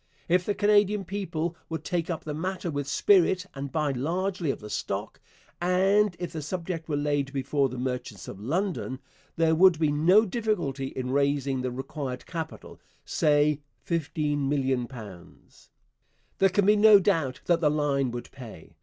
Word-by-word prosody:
If 180 +1 +2
the 205 - 0
Canadian 205 -1 +3
people 170 -4 -3
would 160 - -4
take 175 -2 -2
up 165 - -3
the 150 - -4
matter 180 +2 -3
with 145 -1 -3
spirit 185 +3 +3
and 140 0 -6
buy 150 -3 0
largely 175 +6 -2
of - - -1
the 105 - -9
stock, - - -4 0.4
and 190 +2 +3
if 175 -1 -5
the 160 - -4
subject 165 +1 -4
were 150 - 0
laid 145 -1 0
before 135 0 0
the 130 - -7
merchants 125 -5 -4
of 95 - -8
London, 160 - -2 0.4
'there 165 -1 +3
would 180 +1 +6
be 155 -2 +2
no 180 +9 +5
difficulty 180 - -2
in 130 -1 -4
raising 140 -1 +1
the 130 - -2
required 130 +1 -5
capital, 160 -2 -7 0.3
say 150 0 +2 0.3
£15,000,000.' 135 - -3 0.7
There 195 - +5
can 190 +1 +2
be 210 +1 +6
no 210 -1 +8
doubt 165 -10 0
that 175 -1 +2
the 150 - +4
line 145 -3 +1
would 120 0 -7
pay. 115 -11 -11
155 Hz, 160 wpm, -27 LUFS, 135-185 Hz, 0.7 s, no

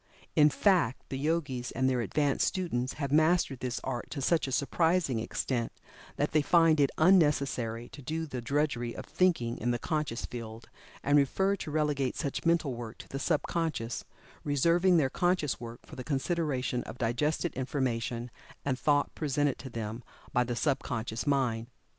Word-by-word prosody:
In 150 0 +7
fact, 170 - +2
the 135 - -3
Yogis, 140 -5 -1
and 130 0 +1
their 130 -2 +1
advanced 140 +5 +1
students 130 -9 -1
have 140 -2 -3
mastered 155 -3 +3
this 125 -1 -3
art 125 -2 -4
to 150 - -5
such 160 +3 +2
a - - -4
surprising 160 -1 +1
extent 115 +1 -2 0.4
that - - 0
they 155 - +4
find 165 0 +4
it 140 -2 +4
unnecessary 140 -9 +3
to 140 - -11
do 160 +5 -3
the 130 -5 -5
drudgery 120 -2 -1
of - - -7
thinking 160 -11 +1
in 120 - -1
the 120 - +1
conscious 150 -4 -2
field, 115 -1 -8 0.3
and 145 +1 +4
prefer 190 +8 +2
to 155 - -6
relegate 145 -4 0
such 145 +2 -2
mental 165 -5 +2
work 120 -2 -7
to - - -12
the 135 - -4
sub 150 +1 +1
conscious, 160 -9 -2 0.4
reserving 170 +5 +3
their 135 -5 +2
conscious 175 -5 +1
work 115 0 -9
for - - -11
the 130 - -6
consideration 135 -4 -1
of 115 - -8
digested 145 +8 0
information 125 -3 -2 0.3
and 135 -2 0
thought 145 -1 +2
presented 145 -2 0
to 130 - -7
them 115 0 -5 0.3
by 125 - +4
the 120 0 -3
sub 135 +1 +1
conscious 115 +1 -4
mind. 125 -5 +1
140 Hz, 170 wpm, -30 LUFS, 120-155 Hz, 0.4 s, In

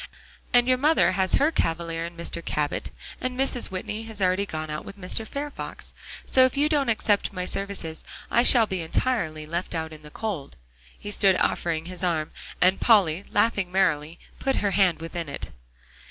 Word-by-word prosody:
And 245 0 +5
your 255 -1 +3
mother 305 -5 +4
has 185 0 +1
her 295 +3 +3
cavalier, 165 - -1
in 170 0 -12
Mr. 170 0 -3
Cabot; 150 -2 -2 0.3
and 255 0 -3
Mrs. 270 -2 +1
Whitney 200 +3 -4
has 220 -2 -7
already 190 +1 +1
gone 155 -2 -4
out 150 - -4
with 200 - -10
Mr. 200 +4 -2
Fairfax. 285 +3 -6 0.3
So 260 - +5
if 255 +1 +2
you 290 +2 +3
don't 290 -5 +1
accept 210 -2 +1
my 180 -1 -3
services, 195 -5 -3 0.3
I 235 - +5
shall 240 -2 +6
be 190 -4 -3
entirely 160 -3 -1
left 170 +3 -3
out 160 -1 -3
in 155 - -12
the 150 - -12
cold." 185 - -5 0.4
He 205 - -7
stood 195 -2 +4
offering 165 -3 0
his 180 +1 -7
arm, 160 -4 0 0.3
and 185 +2 +4
Polly, 195 -6 +4
laughing 200 -5 +1
merrily, 170 -4 +1 0.2
put 270 0 0
her 200 -1 0
hand 185 -5 +2
within 165 -1 -5
it. 140 - -6
185 Hz, 185 wpm, -25 LUFS, 165-225 Hz, 0.4 s, shall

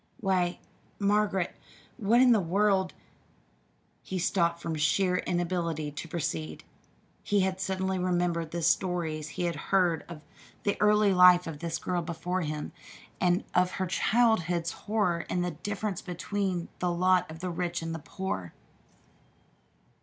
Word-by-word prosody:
"Why, 180 -2 +1 0.4
Margaret, 200 -2 +1 0.4
what 230 +1 +4
in 255 -1 +6
the 225 - +5
world 190 +1 +1 0.5
" - - -38 0.3
he 190 - -5
stopped 170 -1 +1
from 165 - -3
sheer 180 +5 +2
inability 170 -4 -1
to 150 - -7
proceed. 160 -1 -4 0.6
He 205 -2 +1
had 190 0 -1
suddenly 190 0 -1
remembered 175 -2 0
the 170 +1 -4
stories 170 -3 0
he - - -4
had 170 -2 0
heard 180 -5 +2
of 160 -3 -9 0.4
the 200 - +1
early 210 -1 +4
life 180 -1 +7
of 160 -3 -6
this 165 0 -3
girl 180 -1 -2
before 170 +2 -3
him, 150 -2 -4 0.5
and 180 0 +2
of 180 0 +2
her 190 - -1
childhood's 180 -4 +2
horror 205 -6 -1
at 180 - 0
the 180 - -1
difference 200 +3 -4
between 180 0 -3
the 180 - 0
lot 180 0 +2
of 160 - -8
the 180 +2 -4
rich 175 0 -2
and 165 0 -3
the 165 - -4
poor. 145 - -5
180 Hz, 145 wpm, -29 LUFS, 170-190 Hz, 0.6 s, life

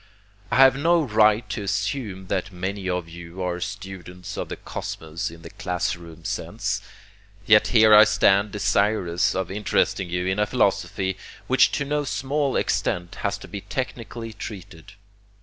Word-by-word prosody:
I - - 0
have 135 0 +7
no 165 +4 +3
right 110 -2 +3
to - - -3
assume 100 -1 -2
that 95 +2 -2
many 95 +1 -4
of 90 -2 -2
you 85 +2 -8
are 90 -1 -2
students 90 -3 -7
of - - -4
the - - -4
cosmos 80 +1 -5
in 85 0 -13
the 85 - -10
class 90 -1 -2
room 85 -1 -13
sense, - - -2 0.6
yet 105 0 +6
here 110 -3 +6
I 105 +1 +10
stand 100 0 +3
desirous 100 -4 +1
of 95 -1 -2
interesting 95 -2 0
you 90 +1 -1
in 95 +2 0
a 105 - +2
philosophy 95 -4 0 0.3
which 130 - +4
to 140 - -1
no 150 +1 0
small 140 0 -1
extent 85 0 -1
has 100 -1 -1
to 110 - -11
be 100 - -6
technically 115 -3 -5
treated. 100 -4 -9
100 Hz, 160 wpm, -24 LUFS, 90-110 Hz, 0.6 s, I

